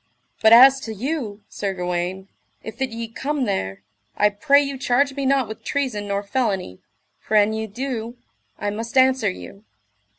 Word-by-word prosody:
But 220 - +5
as 265 +3 +8
to 220 -4 -7
you, 225 -4 -4
Sir 195 -2 -4
Gawaine, 180 +1 -3 0.4
if 220 - -8
that 265 -1 -1
ye 230 0 -5
come 275 +5 -3
there, 95 - -3 0.3
I 210 - +4
pray 210 +8 +3
you 280 -2 -3
charge 275 +2 +1
me 275 -1 -2
not 270 -3 +2
with 220 - -9
treason 250 -8 -2
nor 200 0 -2
felony, 200 - -2 0.4
for 220 - -3
an 210 +1 +4
ye 220 0 -3
do, 235 +1 -5 0.4
I 205 - -2
must 230 +5 -5
answer 260 -4 +4
you. 195 +2 -10
225 Hz, 170 wpm, -22 LUFS, 205-265 Hz, 0.4 s, as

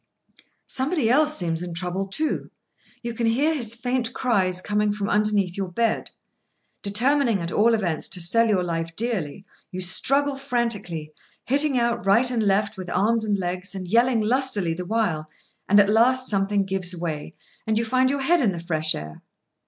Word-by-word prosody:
Somebody 265 -3 0
else 300 +3 +3
seems 165 -2 -1
in 175 -1 -6
trouble, 180 +2 -2
too. 305 +11 -1 0.5
You 235 0 -4
can 230 0 -1
hear 280 +8 +2
his 235 -7 +2
faint 245 0 -2
cries 190 -7 +1
coming 210 +2 0
from 205 -1 -3
underneath 205 -3 +1
your 195 -1 -3
bed. 225 +5 -1 0.7
Determining, 235 +2 +2
at 170 0 -4
all 230 +2 +3
events, 175 -8 -2
to 185 - -3
sell 230 +7 +2
your 195 -4 +1
life 165 -1 -4
dearly, 195 -6 -3 0.2
you 185 - -7
struggle 275 - +2
frantically, 225 - -3 0.3
hitting 280 +1 +2
out 235 -1 0
right 235 +6 +4
and 235 -2 0
left 205 0 +1
with 185 -2 -7
arms 225 +5 +1
and 210 -2 0
legs, 185 +1 -4
and 185 -2 -6
yelling 235 +3 +3
lustily 215 -6 +1
the 180 +2 -6
while, 175 -8 -1 0.4
and 205 +1 +6
at 200 - +5
last 250 +4 +3
something 200 0 +1
gives 185 -2 -2
way, 160 -3 -4 0.4
and 220 0 +1
you 230 - 0
find 255 +3 +2
your 280 0 -1
head 340 +4 +3
in 215 -7 +2
the 170 - -5
fresh 160 -2 -1
air. 75 +1 -8
210 Hz, 175 wpm, -23 LUFS, 180-240 Hz, 0.7 s, and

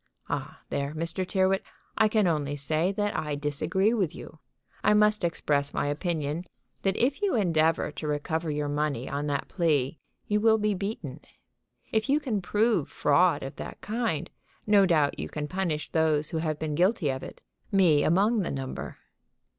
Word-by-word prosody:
"Ah, - - -4
there, 140 +2 -2
Mr. 165 +3 -1
Tyrrwhit, 190 0 +1 0.3
I 220 - +4
can 215 -1 +2
only 150 -4 0
say, 155 +5 0
that 205 0 -1
I 150 -2 -2
disagree 155 +8 0
with 190 -9 0
you. 155 - -11 0.4
I 210 +1 +5
must 210 -1 +3
express 145 -4 0
my - - 0
opinion 150 0 -2 0.4
that 195 0 0
if 270 +4 +1
you 405 -7 +1
endeavor 165 -7 +2
to 150 +1 -6
recover 160 +2 -2
your 150 0 -1
money 145 -4 -1
on 145 +2 -3
that 145 -1 -2
plea 155 -5 0 0.3
you 210 0 +1
will 220 0 +5
be 210 -1 +1
beaten. 180 - -5 0.7
If 220 +4 0
you 290 +2 +4
can 235 -9 -2
prove 210 -3 +1
fraud 170 +4 +3
of 135 - -7
that - - -7
kind, 220 -8 -2 0.4
no 205 -2 +5
doubt 155 -5 +2
you - - -4
can 150 -1 -4
punish 175 -4 -2
those 155 -2 +2
who 165 - -2
have 155 -2 -1
been 155 -1 -3
guilty 180 0 +2
of 130 0 -4
it, - - -9 0.3
me 170 -7 +4
among 205 +7 +3
the 185 - -1
number." 135 -1 -5
165 Hz, 175 wpm, -27 LUFS, 150-205 Hz, 0.7 s, I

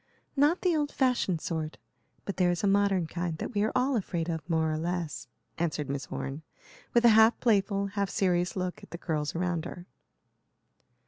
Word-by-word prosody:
"Not 295 +5 +3
the 360 -3 +2
old 295 -2 0
fashioned 240 - +1
sort, 160 -2 -3 0.5
but 200 - -4
there 180 -1 +3
is 175 +1 -1
a - - +3
modern 195 -3 +3
kind 170 0 -3
that 245 - -5
we 205 - +1
are 215 - +1
all 260 +1 +2
afraid 175 -6 -2
of 165 +1 -4
more 160 -1 +2
or 155 - -1
less," 165 -6 -3 0.3
answered 155 -4 -1
Miss 140 -2 -4
Orne, 135 +3 -5 0.5
with 240 0 +4
a - - +9
half 220 +1 +6
playful, 200 -3 +2
half 200 0 -2
serious 180 -2 +1
look 180 -1 -3
at - - -13
the 170 - -6
girls 155 -4 -2
around 175 -1 -1
her. 175 0 -8
180 Hz, 190 wpm, -29 LUFS, 165-205 Hz, 0.5 s, a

